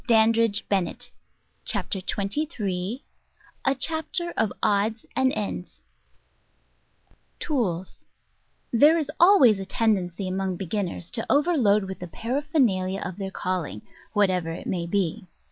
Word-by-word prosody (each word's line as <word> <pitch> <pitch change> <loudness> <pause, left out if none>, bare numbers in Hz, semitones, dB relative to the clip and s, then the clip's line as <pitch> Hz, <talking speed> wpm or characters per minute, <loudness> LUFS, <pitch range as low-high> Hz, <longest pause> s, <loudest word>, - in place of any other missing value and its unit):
Digitized 225 -1 +4
by 200 -2 +2
Google 175 - -4 0.7
Chapter 195 -2 -1
TWENTY 200 +11 -1
THREE 205 - -3 0.6
a 270 0 +2
Chapter 325 +5 +1
of 220 -3 +1
#tfos 215 +1 +1
an* 260 +1 +3
Cttos 200 -5 -4 1.6
TOOLS: 190 - -2 0.8
There 295 +8 +6
is 300 -2 -2
always 285 - +6
a 195 - -5
tendency 195 -4 0
among 190 -1 -2
beginners 185 -2 -3
to 230 -2 -4
overload 275 - +3
with 190 0 -6
the 180 - -6
paraphernalia 230 - 0
of 180 - -5
their 195 -1 -4
calling, 180 - -3 0.3
what 205 -2 +3
ever 180 -3 -1
it 165 - -6
may 170 -2 -2
be. 195 +2 -1
205 Hz, 130 wpm, -25 LUFS, 185-255 Hz, 1.6 s, There